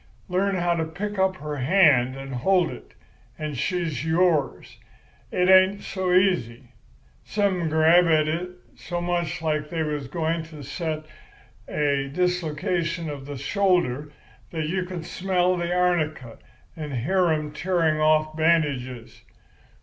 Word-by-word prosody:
Learn 195 +2 0
how 175 -1 +1
to 165 -1 -1
pick 195 +5 -5
up 190 0 +2
her 150 -3 -6
hand 135 -4 +4
and 135 0 -7
hold 175 +7 +2
it, - - -12 0.4
and 155 -2 -4
she's 165 0 -2
yours. 160 -4 0 0.5
It 180 0 +1
ain't 190 +2 +5
so 190 -2 -2
easy. 170 - +1 0.5
Some 200 -3 0
men 165 -2 -1
grab 160 +3 +5
at 155 -2 +3
it 170 +4 -2 0.3
so 175 -1 -5
much 175 -2 -2
like 150 -1 -1
they 165 -1 -1
was 150 -3 -3
going 165 +3 -1
to 155 -3 -11
set 155 +2 -4 0.7
a 140 -2 0
dislocation 170 -1 -1
of 140 -1 -8
the 145 -1 -6
shoulder 150 -3 0 0.4
that 160 -2 -3
you 185 +1 -1
can 180 -2 -6
smell 185 +1 0
the 175 -1 -2
arnica 155 -9 0 0.4
and 150 -3 -6
hear 180 +9 +1
'em 155 -2 -1
tearing 165 -1 0
off 155 0 +2
bandages. 145 -7 0
165 Hz, 140 wpm, -24 LUFS, 150-180 Hz, 0.7 s, ain't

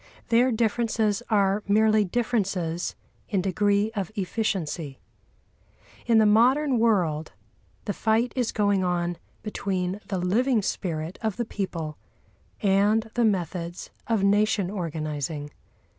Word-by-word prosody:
Their 245 +2 +4
differences 220 -1 +1
are 200 -1 +2
merely 215 +1 +4
differences 190 -6 -1 0.3
in 200 - +1
degree 200 +3 +1
of 200 -2 -3
efficiency. 180 -8 -2 1.1
In 230 -2 +5
the 220 - +6
modern 250 +5 +4
world 170 - +1 0.5
the 205 - -1
fight 225 +4 +1
is 245 -3 0
going 205 -3 +1
on 175 -1 -1 0.2
between 195 -2 -2
the 195 - -2
living 220 +6 +1
spirit 165 -2 -3
of 220 -4 -2
the 240 - -1
people 170 -8 -4 0.6
and 210 +3 +3
the 240 - +1
methods 175 -3 -2 0.2
of 225 -4 +1
nation 200 -1 +2
organising. 155 -5 -4
200 Hz, 115 wpm, -26 LUFS, 180-220 Hz, 1.1 s, the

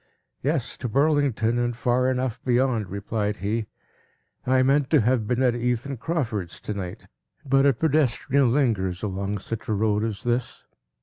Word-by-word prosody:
"Yes; - - -1
to 120 - -4
Burlington, 135 -4 +2
and 120 -1 -1
far 125 +1 +2
enough 125 -2 -2
beyond," 120 -5 +1
replied 105 +1 -2
he. 105 +2 -2 0.8
"I 130 0 +4
meant 135 +1 +2
to 150 -4 +4
have 115 -1 +1
been 125 +2 +1
at 125 -2 +3
Ethan 125 +3 -2
Crawford's 115 - -3
to 105 - -4
night; 95 -3 -6 0.4
but 135 +1 +4
a 140 - +5
pedestrian 140 -2 +2
lingers 105 -9 0
along 100 0 -2
such 110 +3 -6
a - - +2
road 105 0 +1
as 110 -3 -3
this. 120 0 -2
120 Hz, 160 wpm, -25 LUFS, 105-130 Hz, 0.8 s, a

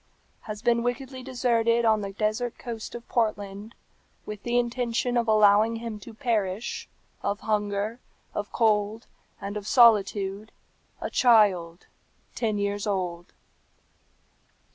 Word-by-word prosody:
"Has 210 +1 -6
been 235 -1 +3
wickedly 255 +2 -3
deserted 235 -2 +1
on 220 -1 +3
the 200 -1 -4
desert 215 +4 -2
coast 230 -2 -7
of 240 0 -9
Portland, 210 -2 -2 0.5
with 210 -1 -7
the 240 0 0
intention 245 0 0
of 235 -1 +1
allowing 215 +1 +5
him 225 -2 -5
to 230 - -11
perish 220 -4 -2 0.3
of 200 +1 -2
hunger, 210 +1 -1 0.3
of 205 0 -4
cold, 215 0 +1 0.3
and 200 +1 -5
of 210 -1 -5
solitude, 210 -3 +3 0.5
a - - -4
child 195 -8 +3 0.5
ten 220 -3 -1
years 200 +1 -2
old. 180 -3 -3
215 Hz, 120 wpm, -26 LUFS, 205-235 Hz, 0.5 s, allowing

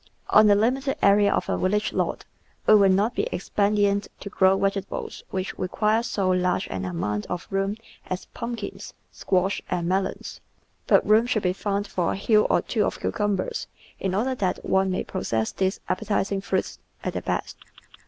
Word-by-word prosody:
On 215 0 +7
the 205 - +6
limited 265 +6 +1
area 200 0 +5
of - - 0
a - - -1
village 210 +3 0
lot - - -1 0.4
it - - +7
will 200 -2 +6
not 200 +5 +2
be - - -1
expedient 200 +1 +1
to 200 - -7
grow 190 -1 +4
vegetables 195 0 -3
which 190 0 -3
require 215 +4 +1
so 195 -5 0
large 180 0 +1
an 95 -1 -3
amount 105 +4 -2
of 180 -1 -4
room 195 +2 -1 0.3
as 185 0 -4
pumpkins, 235 -3 -6 0.2
squash, 190 +1 0
and 175 -2 -1
melons, 190 +2 -2 0.5
but - - +4
room 220 +3 +5
should 220 -4 0
be 180 -1 +2
found 200 +1 -2
for 180 -4 -1
a - - -4
hill 215 +1 +3
or - - +2
two 220 -4 0
of - - -2
cucumbers 205 -3 -1 0.3
in 190 -1 -1
order 250 +6 +1
that 190 -7 -2
one 190 0 +2
may 185 - -1
possess 110 - -2
these 190 +1 -1
appetising 200 -2 -1
fruits - - -2 0.2
at - - -2
their - - -3
best. - - -3
195 Hz, 175 wpm, -25 LUFS, 185-210 Hz, 0.5 s, On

